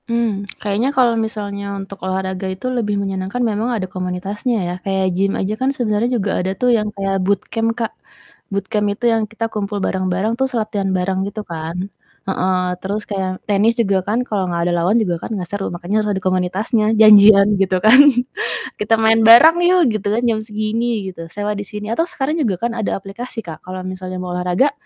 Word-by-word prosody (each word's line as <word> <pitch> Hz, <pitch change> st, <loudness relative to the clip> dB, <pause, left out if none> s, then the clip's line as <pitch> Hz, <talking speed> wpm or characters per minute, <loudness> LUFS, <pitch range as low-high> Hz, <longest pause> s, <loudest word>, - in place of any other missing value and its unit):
Mmm, 220 Hz, -4 st, -1 dB
kayaknya 210 Hz, +5 st, 0 dB
kalau 245 Hz, -2 st, +4 dB
misalnya 205 Hz, -2 st, -5 dB
untuk 195 Hz, 0 st, -8 dB
olahraga 190 Hz, 0 st, -3 dB
itu 185 Hz, +5 st, -7 dB
lebih 210 Hz, -3 st, -1 dB
menyenangkan 195 Hz, +2 st, -3 dB
memang 215 Hz, +3 st, -1 dB
ada 190 Hz, -, -2 dB
komunitasnya 185 Hz, +6 st, -3 dB
ya, 175 Hz, -, -3 dB
kayak 190 Hz, -1 st, 0 dB
gym 195 Hz, +1 st, +1 dB
aja 195 Hz, +2 st, -1 dB
kan 260 Hz, -, +2 dB
sebenarnya 225 Hz, -1 st, 0 dB
juga 200 Hz, -2 st, -1 dB
ada 185 Hz, +1 st, -2 dB
tuh 250 Hz, -1 st, +1 dB
yang 210 Hz, -1 st, -2 dB
kayak 195 Hz, -1 st, -1 dB
bootcamp 215 Hz, +3 st, 0 dB
Kak, 230 Hz, -2 st, -2 dB, 0.6 s
bootcamp 205 Hz, +1 st, -1 dB
itu 240 Hz, -, -6 dB
yang 225 Hz, -1 st, +1 dB
kita 225 Hz, +1 st, -3 dB
kumpul 205 Hz, -1 st, -3 dB
bareng-bareng, 185 Hz, +3 st, -1 dB
terus 265 Hz, 0 st, -1 dB
latihan 210 Hz, -3 st, -2 dB
bareng 185 Hz, +1 st, -1 dB
gitu 215 Hz, +1 st, -6 dB
kan. 165 Hz, 0 st, -6 dB, 0.5 s
Heeh, 185 Hz, -1 st, 0 dB, 0.2 s
terus 200 Hz, +3 st, -3 dB
kayak 190 Hz, -2 st, -2 dB, 0.2 s
tenis 210 Hz, +2 st, +3 dB
juga 200 Hz, -3 st, +1 dB
kan, 220 Hz, +4 st, +1 dB
kalau 205 Hz, -3 st, -1 dB
nggak 170 Hz, -1 st, -1 dB
ada -, -, 0 dB
lawan 190 Hz, +7 st, +2 dB
juga 180 Hz, -5 st, 0 dB
kan -, -, -6 dB
nggak 180 Hz, -, -4 dB
seru, 205 Hz, -1 st, -3 dB
makanya 175 Hz, +4 st, -4 dB
harus 210 Hz, -, -1 dB
ada -, -, -4 dB
komunitasnya, 190 Hz, +5 st, 0 dB
janjian 205 Hz, -2 st, +8 dB
gitu 190 Hz, -1 st, +2 dB
kan, 235 Hz, +5 st, +8 dB, 0.8 s
"Kita 210 Hz, +2 st, +2 dB
main 225 Hz, 0 st, +5 dB
bareng 310 Hz, +9 st, +9 dB
yuk," 365 Hz, 0 st, +4 dB
gitu 205 Hz, -, -7 dB
kan, 230 Hz, -, +1 dB
"jam 220 Hz, -2 st, +1 dB
segini," 215 Hz, 0 st, -2 dB
gitu. 165 Hz, -2 st, -9 dB
"Sewa 205 Hz, 0 st, -2 dB
di 205 Hz, -, -4 dB
sini," 210 Hz, +1 st, -7 dB
atau 325 Hz, +8 st, +1 dB
sekarang 300 Hz, 0 st, -2 dB
juga 215 Hz, -10 st, 0 dB
kan -, -, -5 dB
ada 220 Hz, -3 st, -1 dB
aplikasi 225 Hz, +5 st, -7 dB
Kak, 160 Hz, -2 st, -8 dB
kalau 185 Hz, 0 st, -6 dB
misalnya 185 Hz, 0 st, -6 dB
mau 180 Hz, -1 st, -5 dB
olahraga, 180 Hz, +10 st, +1 dB
205 Hz, 195 wpm, -18 LUFS, 190-225 Hz, 0.8 s, bareng